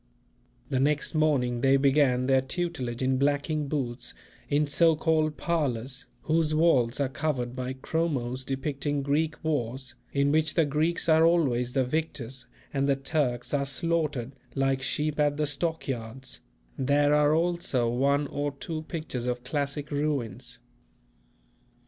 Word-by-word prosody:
The 130 - +2
next 145 +2 +1
morning 135 -6 +2
they 135 +1 +5
began 135 -2 +3
their 135 0 +4
tutelage 130 -4 -3
in 130 0 +2
blacking 145 +2 +1
boots 130 -4 -3 0.3
in 150 +1 +3
so 160 +3 +4
called 155 -1 +1
parlours, 135 -6 -1 0.2
whose 155 -1 +1
walls 135 -7 +3
are 140 - +2
covered 130 -3 -2
by 130 0 -3
chromos 130 -3 -2
depicting 140 +1 -2
Greek 155 +3 +1
wars 130 -4 -2 0.2
in 140 0 +2
which 155 0 +2
the 165 - +4
Greeks 155 +5 0
are 160 0 +5
always 130 -8 +2
the 130 -2 +2
victors 130 -3 -3 0.3
and 140 0 +1
the 140 - +4
Turks 135 -3 -1
are 140 -1 +1
slaughtered 150 -4 -1 0.2
like 135 -1 +1
sheep 150 +3 -1
at 145 -1 +2
the 150 - +1
stockyards; 135 -5 -3 0.4
there 145 +2 +3
are 150 +1 +4
also 170 -7 +1
one 140 +4 +2
or 145 0 -3
two 155 +3 -5
pictures 155 -7 -4
of 125 0 -2
classic 145 +2 -3
ruins. 140 -8 -2
140 Hz, 140 wpm, -28 LUFS, 130-155 Hz, 0.4 s, they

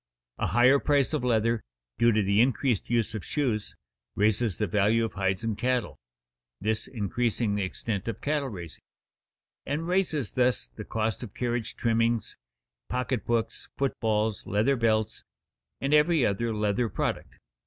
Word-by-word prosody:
A - - +1
higher 125 +3 +5
price 145 0 +2
of 150 -5 0
leather, 115 -1 +2 0.4
due 120 0 +5
to 110 -1 +2
the 100 +2 +3
increased 125 -2 +1
use 115 -3 +1
of 110 - -4
shoes, 120 -8 -1 0.4
raises 105 -1 +2
the 105 - +1
value 105 +3 +2
of 115 - -5
hides 95 +1 -1
and 115 -2 -1
cattle 125 +1 -1 0.6
(this 110 +2 -1
increasing 115 0 -1
the 105 - 0
extent 100 +1 -3
of 115 - -3
cattle 145 -2 -1
raising) 85 -7 -8 0.8
and 155 +4 -3
raises 175 - 0
thus 125 - +1
the - - -9
cost 110 0 -2
of 120 -6 -8
carriage 120 -2 -2
trimmings, 115 0 +1 0.5
pocket 125 -2 -1
books, 115 -1 -1
foot 140 -1 +1
balls, 110 -1 0
leather 110 +7 +2
belts, 110 -3 0 0.6
and 140 +2 0
every 150 -1 +4
other 115 +3 0
leather 105 +2 0
product. - - -3
115 Hz, 155 wpm, -27 LUFS, 105-125 Hz, 0.8 s, higher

